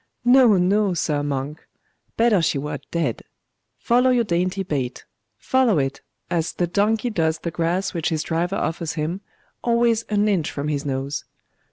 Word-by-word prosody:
No, 245 -4 +6
no, 195 +1 +2
sir 150 -3 0
monk! 145 +1 -4 0.5
Better 225 -5 +4
she 155 - +1
were 150 +2 -4
dead!.... 160 -9 -1 0.6
Follow 250 +2 +3
your 245 -2 +3
dainty 185 0 -1
bait! 135 -8 -3 0.3
follow 260 -7 +2
it, 135 -1 -1 0.3
as 165 -1 -1
the 175 - 0
donkey 215 +6 +1
does 160 -5 +1
the 170 - -5
grass 175 +4 -1
which 170 -3 -1
his 155 -2 -1
driver 175 +3 -1
offers 165 0 -2
him, 165 +4 -3 0.4
always 235 -1 +2
an 210 0 +2
inch 185 -7 +1
from 145 +1 -4
his 145 -1 -2
nose.... 135 +1 -3
175 Hz, 160 wpm, -22 LUFS, 150-210 Hz, 0.6 s, No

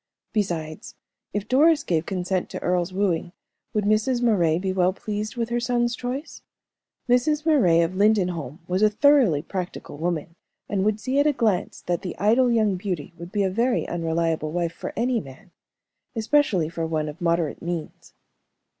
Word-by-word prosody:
Besides, 165 -7 -3 0.4
if 205 0 -3
Doris 295 +4 +4
gave 165 -2 -1
consent 185 -1 -2
to - - -5
Earle's 180 0 0
wooing, 185 -3 -1 0.4
would 210 - 0
Mrs. 215 +4 +1
Moray 175 -9 +3
be 190 +1 -2
well 185 0 +2
pleased 210 +2 -4
with 230 -1 -1
her 240 0 0
son's 240 0 0
choice? 255 +6 -5 0.7
Mrs. 295 +5 +2
Moray 190 - +4
of 170 +2 0
Lindenholm 180 - +1
was 185 +2 0
a 215 - +6
thoroughly 220 - +4
practical 180 -6 -6
woman, 165 -1 -2 0.3
and 195 -2 0
would 215 +1 +1
see 260 +5 0
at 290 - +4
a - - +5
glance 215 -8 0
that 175 +1 -2
the 185 -3 -6
idle 235 +5 +3
young 215 -5 +2
beauty 180 -6 -4
would 170 +1 -8
be 205 -1 +1
a 190 - +1
very 235 +5 +1
unreliable 165 -2 -1
wife 170 0 -1
for - - -6
any 240 +1 +1
man, 155 +4 -12 0.6
especially 225 - +2
for 165 0 -3
one 155 -1 -1
of 150 +3 -8
moderate 170 -3 0
means. 170 -2 -6
190 Hz, 170 wpm, -24 LUFS, 170-235 Hz, 0.7 s, a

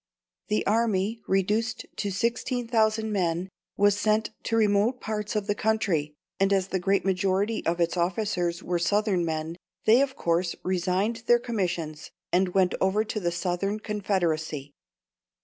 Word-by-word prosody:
The 210 0 0
army, 220 -1 +1
reduced 210 +5 0
to 205 - -1
16,000 225 0 0
men, 180 -2 0 0.3
was 205 0 +4
sent 215 +1 +1
to 225 - 0
remote 215 +3 +2
parts 210 -1 -3
of 210 -1 0
the 205 - +1
country, 195 -9 0 0.2
and 195 0 +3
as 195 -1 +2
the 190 - 0
great 195 +2 +1
majority 195 +3 +1
of 170 +1 0
its 170 +1 +1
officers 175 -1 -1
were 175 -1 -1
Southern 200 +1 +1
men, 160 0 -3 0.3
they 230 +4 +6
of 275 -1 0
course 170 +1 0
resigned 185 +5 0
their 240 - +6
commissions, 180 -10 -3 0.2
and 180 0 +1
went 185 -2 +3
over 190 +3 +2
to 215 0 -3
the 175 -3 -1
Southern 185 +4 -1
Confederacy. 165 -9 -1
195 Hz, 150 wpm, -27 LUFS, 175-215 Hz, 0.3 s, they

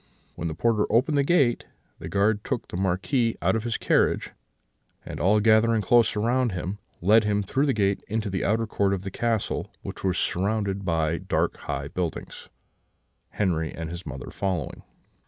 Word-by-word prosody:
When 85 - -4
the 80 - -4
porter 110 +3 +2
opened 130 +6 +2
the 140 - +3
gate, 140 -6 +2 0.3
the - - -7
guard 105 +1 +1
took 130 -4 -3
the - - -8
Marquis 95 +7 0
out - - +1
of 110 - -1
the 115 -2 -1
carriage, - - +1 0.7
and, - - -7
all 105 +4 +4
gathering 110 +1 +4
close 115 +3 +4
round 120 +1 +1
him, 95 +3 -4 0.2
led 110 +5 +5
him 105 -1 +1
through 135 +9 0
the 135 - +2
gates 100 -2 0
into 105 -1 -2
the 95 - -2
outer 115 +2 +1
court 100 -2 +1
of 95 - -7
the 95 - -5
castle, 115 0 -1
which - - -7
was 95 -2 +1
surrounded 100 0 -1
by 80 -1 0
dark - - 0
high 70 -1 -4
buildings; 85 +2 -5 0.8
Henri 85 -6 0
and 80 0 -6
his 85 +1 -6
mother 65 -4 -7
following. 90 -8 -3
105 Hz, 175 wpm, -25 LUFS, 90-115 Hz, 0.8 s, led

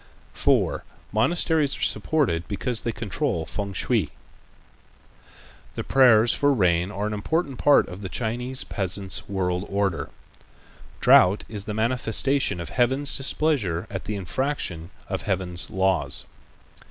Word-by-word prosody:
4. - - +1 0.3
Monasteries 150 +3 +2
Are - - -10
Supported 130 - +1
Because 110 +3 -2
They 115 - -2
Control 110 - -2
Fêng 100 +1 -5
shui - - 0 1.7
The - - -3
prayers 120 -4 +5
for 145 0 +2
rain 90 -4 +2
are 105 0 -3
an 105 - -2
important 140 +6 -2
part 145 - +5
of 90 +2 -9
the 95 - -5
Chinese 125 +5 -2
peasant's 95 0 -3
world 90 -2 -1
order. 100 -3 -1 0.9
Drought 90 +3 +6
is 105 -3 -5
the 105 - -4
manifestation 125 +1 +1
of 85 - -5
Heaven's 130 +4 +1
displeasure 135 - 0
at 95 -2 -5
the 105 - -3
infraction 95 - -3 0.2
of - - -3
Heaven's 90 -2 -2
laws. 95 -5 +1
105 Hz, 130 wpm, -24 LUFS, 95-130 Hz, 1.7 s, Drought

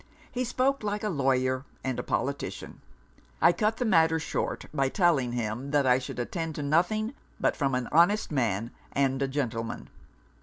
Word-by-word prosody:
He 255 0 -1
spoke 255 +3 +1
like 210 0 -2
a 210 - 0
lawyer 130 -4 +1 0.2
and 130 -2 -2
a - - 0
politician. - - -3 0.6
I - - +6
cut 215 +3 0
the 250 - -1
matter 160 -6 +4
short, 160 - -3
by 135 -3 +1
telling 145 - +2
him 120 +3 -3
that 145 -1 +2
I 125 0 +5
should 130 - -7
attend 160 +6 -3
to 150 - -3
nothing 180 - +1 0.3
but - - +2
from 135 -3 0
an 125 -1 -1
honest 175 +7 +4
man 115 -5 0 0.2
and 135 -1 +1
a 135 - +2
gentleman.' 115 -5 -3
140 Hz, 175 wpm, -28 LUFS, 130-180 Hz, 0.6 s, I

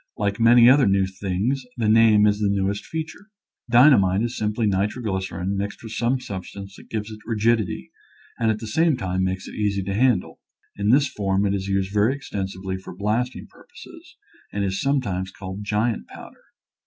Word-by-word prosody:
Like 100 +1 -1
many 120 +1 +7
other 135 0 +6
new 95 0 +3
things 100 +7 -2
the 115 -3 0
name 110 -1 +5
is 105 0 +2
the 105 -1 +1
newest 100 0 -1
feature. 160 +6 -6 0.4
Dynamite 115 -6 +5
is 120 0 -3
simply 105 +2 -1
nitroglycerin 95 -2 -2
mixed 100 +3 -4
with 110 - -8
some 120 +3 0
substance 100 -2 -8
that - - -16
gives 110 -1 -4
it 110 - -9
rigid 115 +1 +2
ity 65 -9 -6 0.5
and 115 -1 +2
at 110 - +1
the 110 - -8
same 160 +6 +2
time 95 -4 -2
makes 95 0 -3
it - - -9
easy 100 -2 -1
to 95 +1 -3
handle. 115 -3 +1 0.4
In 100 +1 -1
this 140 +4 +4
form 100 -3 -1
it 100 - +1
is 95 -1 -3
used 95 0 -1
very 110 +7 +2
exten 100 -8 -4
sively 95 0 -5
for 95 -1 -10
blasting 110 +6 -2
purposes - - -15 0.3
and 100 -1 -2
is 95 0 -2
sometimes 105 -10 -1
called 95 +1 -8
giant 105 +2 -1
powder. - - -13
105 Hz, 185 wpm, -23 LUFS, 95-115 Hz, 0.5 s, many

